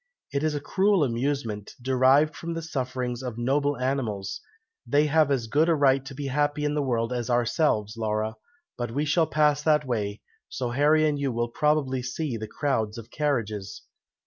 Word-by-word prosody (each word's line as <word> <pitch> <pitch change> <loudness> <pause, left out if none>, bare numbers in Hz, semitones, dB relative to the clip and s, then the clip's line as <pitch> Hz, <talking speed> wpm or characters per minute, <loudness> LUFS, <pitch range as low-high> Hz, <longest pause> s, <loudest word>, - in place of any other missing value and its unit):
"It 140 - 0
is 155 -1 0
a - - -1
cruel 190 +4 +2
amusement, 120 -4 -2
derived 130 +4 +3
from 170 +2 -5
the 165 - -4
sufferings 130 -5 -3
of 125 -3 -5
noble 140 +4 +1
animals; 125 -7 -2 0.4
they 145 +5 +2
have 155 0 +3
as 130 -5 0
good 150 +9 +2
a 165 - +4
right 135 -2 +3
to 135 - -8
be 145 +1 -5
happy 145 +2 0
in 150 - 0
the 150 - 0
world 120 -3 0
as 120 -1 -3
ourselves, 120 -3 +1
Laura; 110 -1 -1 0.5
but 120 -1 -2
we 145 +6 -1
shall 160 +2 +2
pass 150 -1 +2
that 150 -1 +3
way, 105 -5 -2 0.3
so 125 -2 -3
Harry 150 +4 +4
and 145 -1 0
you 140 -2 0
will 120 0 -1
probably 140 -1 +1
see 125 +2 -3
the 110 -1 -5
crowds 110 -3 -1
of 115 +1 -10
carriages." 110 -8 -2
135 Hz, 185 wpm, -26 LUFS, 120-150 Hz, 0.5 s, a